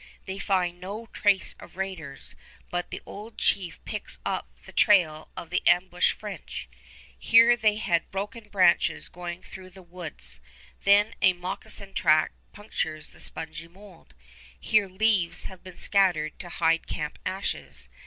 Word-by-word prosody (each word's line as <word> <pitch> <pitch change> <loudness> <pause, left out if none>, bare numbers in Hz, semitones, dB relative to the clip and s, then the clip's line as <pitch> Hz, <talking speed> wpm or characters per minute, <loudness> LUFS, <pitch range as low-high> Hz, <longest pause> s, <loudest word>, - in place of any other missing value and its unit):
They 190 +1 -5
find 180 -3 0
no 205 +5 -6
trace 200 -2 +2
of - - -13
raiders, 165 -8 -4 0.4
but 175 0 -2
the - - -6
old 215 +2 -9
chief 185 -3 +1
picks - - -4
up - - -1 0.2
the - - -11
trail 165 -7 +4
of 170 - -7
the 180 - +1
ambushed 175 0 +4
French. 210 -2 -7 0.5
Here 230 +1 +7
they 215 -3 +3
had 175 -6 0
broken 210 +3 -5
branches 185 -4 +3
going 175 +1 -6
through 185 0 -10
the 185 0 -14
woods; 175 -3 -6 0.5
there 205 +2 +6
a 190 - +6
moccasin 185 +2 -5
track 155 0 +4 0.2
punctures 160 -7 -3
the - - -12
spongy 160 +1 -6
mold; 190 0 -17 0.4
here 215 -2 +3
leaves 190 -2 +2
have 190 -2 -9
been 185 -1 -11
scattered 175 -7 +2
to 175 - -7
hide 165 -1 +2
camp 150 -1 -4
ashes. 190 +1 -4
185 Hz, 145 wpm, -27 LUFS, 170-200 Hz, 0.5 s, Here